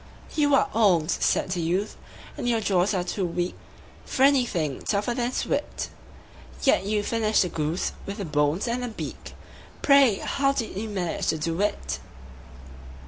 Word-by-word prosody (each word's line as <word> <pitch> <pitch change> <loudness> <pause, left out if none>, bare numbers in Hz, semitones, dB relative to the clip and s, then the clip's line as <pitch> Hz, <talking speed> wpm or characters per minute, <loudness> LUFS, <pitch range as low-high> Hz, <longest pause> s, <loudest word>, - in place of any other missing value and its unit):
"You 290 -2 +4
are - - +3
old," 185 -8 +3
said - - +1
the 180 -2 -1
youth, 185 +6 -1 0.4
"and 245 - -2
your 230 -1 +2
jaws 195 -1 +1
are 180 - 0
too 190 +2 -3
weak 175 +1 -2 0.5
For 265 - 0
anything 230 - +2
tougher 205 +3 0
than 240 0 -1
suet; - - -2 0.7
Yet 270 - +3
you 210 0 0
finished 220 -1 +2
the 180 - -2
goose, 160 +2 -1 0.2
with 200 +1 -5
the 200 - -4
bones 150 +5 +1
and 240 +2 -1
the 245 - -2
beak 225 - -7 0.5
Pray, 275 -6 +6
how 275 +7 0
did 230 -7 -3
you 215 +3 -4
manage 180 -5 -2
to 160 - +2
do 165 +4 -2
it?" 65 - -1
200 Hz, 165 wpm, -26 LUFS, 175-240 Hz, 0.7 s, Pray